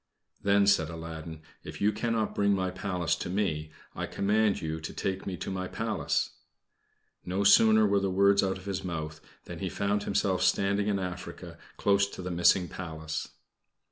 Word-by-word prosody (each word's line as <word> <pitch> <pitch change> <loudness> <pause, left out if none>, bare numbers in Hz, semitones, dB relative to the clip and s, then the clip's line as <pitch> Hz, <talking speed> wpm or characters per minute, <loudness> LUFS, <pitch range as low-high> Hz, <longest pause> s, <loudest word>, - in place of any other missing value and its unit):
"Then," 100 0 +4
said 90 -6 +3
Aladdin, 80 -1 -7 0.2
"if - - -8
you 105 +1 +3
cannot 110 0 -1
bring 100 0 +2
my 95 -1 -1
Palace 90 -5 -1
to - - -5
me, 85 -6 -1 0.2
I - - -4
command 105 +1 +1
you 80 0 -3
to 80 - -7
take 95 0 -3
me 95 -2 -3
to - - -5
my 95 0 -3
Palace." - - -1 0.9
No 95 +3 -1
sooner 110 +2 +6
were 100 -1 +3
the 100 0 0
words 100 +1 +4
out 95 -1 0
of 95 - -13
his 100 -2 -3
mouth 80 -3 -5 0.2
than - - -8
he - - -2
found 100 +1 0
himself 95 -2 +1
standing 100 +2 +2
in 100 -1 +1
Africa, 90 -1 -6 0.2
close 100 0 +3
to 95 - -8
the 90 - -4
missing 85 +1 +4
Palace. 80 -3 -5
95 Hz, 175 wpm, -29 LUFS, 85-100 Hz, 0.9 s, sooner